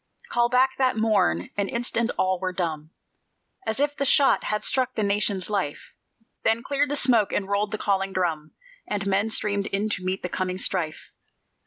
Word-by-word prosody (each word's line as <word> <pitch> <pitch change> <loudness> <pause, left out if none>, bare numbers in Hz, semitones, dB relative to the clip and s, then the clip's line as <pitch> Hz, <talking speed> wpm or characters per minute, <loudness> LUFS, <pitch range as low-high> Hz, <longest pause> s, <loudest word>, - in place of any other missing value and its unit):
Call 240 0 +2
back 260 +2 +3
that 255 -3 +1
morn: 200 - +1
an 200 -1 0
instant 235 -1 0
all 185 -1 +1
were 185 0 -2
dumb, 160 -4 -3 0.8
As 220 - -1
if 290 0 +1
the 280 - -1
shot 275 0 +4
had 210 0 -1
struck 255 -1 +1
the 215 - 0
Nation's 200 -2 +1
life; 195 -9 -3 0.5
Then 225 +1 +2
cleared 285 +1 0
the 290 - -1
smoke, 235 -7 +3
and 195 - -1
rolled 200 +1 0
the 215 - -3
calling 195 -2 0
drum, 165 -5 -2 0.3
And 200 -1 -2
men 200 +2 +1
streamed 205 -2 0
in 205 +2 -1
to 185 - -3
meet 185 +1 -2
the - - -1
coming 185 0 -3
strife. 175 -4 -2
205 Hz, 185 wpm, -25 LUFS, 185-235 Hz, 0.8 s, shot